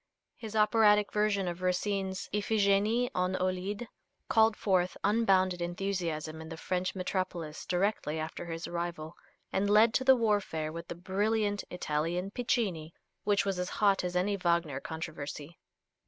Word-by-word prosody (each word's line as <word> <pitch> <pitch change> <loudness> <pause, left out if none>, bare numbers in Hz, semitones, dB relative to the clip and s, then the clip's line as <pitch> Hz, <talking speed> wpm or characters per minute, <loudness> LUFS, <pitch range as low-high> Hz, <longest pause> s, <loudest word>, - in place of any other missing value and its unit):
His 220 -2 -8
operatic 210 -1 +4
version 210 -2 +1
of 175 +1 -4
Racine's 190 +1 -1
"Iphigènie 210 +3 +2
en 180 +1 +1
Aulide" 185 +5 -2 0.4
called 220 -1 +4
forth 185 -3 +1
unbounded 190 -4 +3
enthusiasm 175 -3 -3
in 160 - -9
the 165 - -7
French 185 +2 -2
metropolis 185 -4 -3
directly 180 -4 0
after 160 +2 -5
his 165 0 -5
arrival, 170 -2 -4 0.4
and 195 +2 +1
led 215 +2 +6
to - - +2
the 265 0 +7
warfare 205 -9 0
with 170 +1 -7
the - - -6
brilliant 205 +3 0
Italian 175 +3 -2
Piccini, 200 -10 -1 0.3
which 200 -1 +2
was 195 -2 -1
as 180 - -2
hot 200 -3 +2
as 180 0 -3
any 195 +3 +1
Wagner 170 -6 0
controversy. 155 0 -7
185 Hz, 140 wpm, -31 LUFS, 170-205 Hz, 0.4 s, the